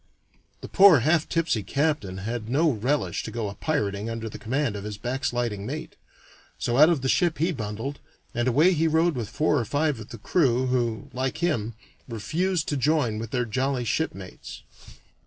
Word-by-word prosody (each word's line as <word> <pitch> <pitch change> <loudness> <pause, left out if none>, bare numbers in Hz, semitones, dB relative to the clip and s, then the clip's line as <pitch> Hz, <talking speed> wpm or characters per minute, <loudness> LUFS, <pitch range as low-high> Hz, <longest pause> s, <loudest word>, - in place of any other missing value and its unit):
The - - -7
poor 190 -9 +7
half 160 +4 +2
tipsy 165 -9 +1
captain 140 -4 -1
had 110 +3 -4
no 155 +5 +3
relish 130 +6 -1
to - - -6
go 115 -3 -3
a - - -7
pirating 105 -8 -2
under 115 -1 -4
the - - -9
command 130 +1 -1
of 100 - -6
his 105 -1 -5
backsliding 120 -3 -2
mate, - - -6 0.6
so 120 0 -1
out 155 +2 +8
of 165 -6 +1
the - - +1
ship 170 +4 +2
he 165 +5 +1
bundled, 115 +1 -5 0.3
and 120 +1 0
away 155 +9 +4
he 165 0 +2
rowed 160 +2 +3
with 120 -6 -4
four 150 -1 +1
or - - 0
five 145 +1 0
of 110 - -10
the 115 - -8
crew, 130 - +2
who, 120 -3 -1
like 130 +3 -2
him, 120 -10 -1 0.3
refused 160 - -1
to 145 - 0
join 135 -5 +1
with 115 -1 -5
their 125 0 -1
jolly 130 +2 -1
shipmates. 100 - -4
130 Hz, 185 wpm, -25 LUFS, 110-155 Hz, 0.6 s, out